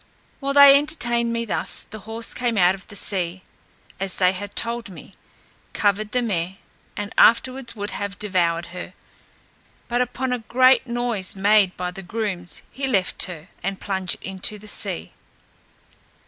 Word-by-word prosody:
While 275 0 -2
they 280 -1 +10
entertained 240 -6 0
me 230 0 -1
thus, 215 - -1
the 215 - -7
horse 225 +1 -2
came 240 -3 -1
out 180 -1 +5
of 190 0 -11
the 210 - -11
sea, 185 -2 -2 0.6
as 190 -1 0
they 180 -1 +4
had 200 +1 -7
told 235 -1 -1
me, 185 +1 -12 0.6
covered 210 +1 +1
the 250 +1 +1
mare, 190 -4 -2 0.4
and 205 +1 -4
afterwards 255 +2 +4
would 205 -1 -4
have 200 -1 -4
devoured 175 -5 +1
her; 180 - -8 0.9
but 245 +1 +1
upon 250 +1 -1
a 250 - -1
great 255 +3 +4
noise 235 -6 -1
made 200 -1 +3
by 180 0 -3
the 195 +1 -9
grooms, 185 -3 -4
he 270 0 -3
left 195 -8 +1
her, 175 -1 -9
and 195 -1 -3
plunged 190 -2 -2
into 195 +2 -4
the 210 +1 -13
sea. 85 - -3
205 Hz, 160 wpm, -23 LUFS, 185-235 Hz, 0.9 s, they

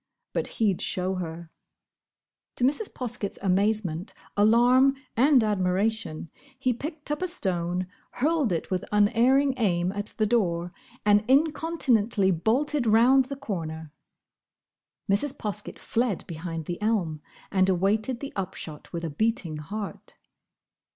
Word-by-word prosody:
But - - -1
he'd 205 -5 +1
show 185 +1 0
her! 170 -2 -6 1.0
To - - -3
Mrs. 295 - +1
Poskett's 220 -5 -4
amazement, 195 -2 0 0.2
alarm, 245 +6 +5 0.2
and 260 0 +5
admiration, 195 -4 -1 0.3
he 255 -1 +1
picked 300 +4 -6
up 295 - -2
a 370 - 0
stone, 180 - -1 0.3
hurled 295 - +1
it 170 +2 -2
with 185 -1 0
unerring 240 +7 +4
aim 180 -5 +1
at 205 +1 -4
the 215 - +2
door, 180 -6 0 0.3
and 205 0 +5
incontinently 265 - +2
bolted 245 - 0
round 245 +5 +5
the 280 +2 -6
corner. 160 - -5 1.2
Mrs. 235 +8 +1
Poskett 210 -1 -5
fled 230 -5 -1
behind 165 -1 -5
the 175 +4 -5
elm 185 -9 0 0.3
and 190 -1 +3
awaited 210 +7 +1
the 280 - -6
upshot 170 -5 -6
with 170 0 -4
a 160 - -4
beating 195 -2 -1
heart. 200 +7 -7
210 Hz, 125 wpm, -26 LUFS, 180-250 Hz, 1.2 s, alarm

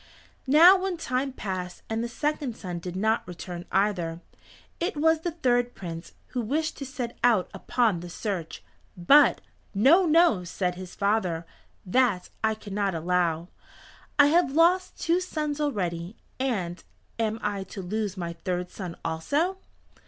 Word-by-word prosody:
Now 340 +7 +8
when 375 -2 -2
time 270 -3 -1
passed 185 -6 -5
and 225 +1 -2
the - - -2
second 285 -1 -2
son 180 -3 -5
did 180 +1 -6
not 220 +4 +1
return 175 0 -7
either, 180 -4 0 0.6
it 340 -2 -2
was 320 +1 +3
the 345 - -2
third 245 -7 0
Prince 165 -2 -7 0.2
who 250 - -2
wished 305 +8 -1
to 275 - -6
set 250 -3 -5
out 230 -7 +3
upon 225 -8 +1
the 175 +1 -8
search. 175 - -4 0.3
But, 280 +13 +5 0.3
"No, 315 - +5
no," 315 - +4
said 180 +1 -2
his 180 0 -9
father, 195 -5 0 0.4
"that 205 -2 +1
I 220 0 +2
cannot 200 -3 -2
allow. 170 0 0 0.7
I 290 - +8
have 340 -6 +3
lost 360 +4 +3
two 335 +2 +2
sons 305 -5 -3
already, 180 - -2 0.2
and 195 -10 -2 0.4
am 220 -1 0
I 205 -2 -1
to 195 0 -8
lose 205 +1 -3
my 170 -2 -4
third 180 +1 -3
son 180 -4 -6
also?" 290 - 0
215 Hz, 150 wpm, -27 LUFS, 180-290 Hz, 0.7 s, Now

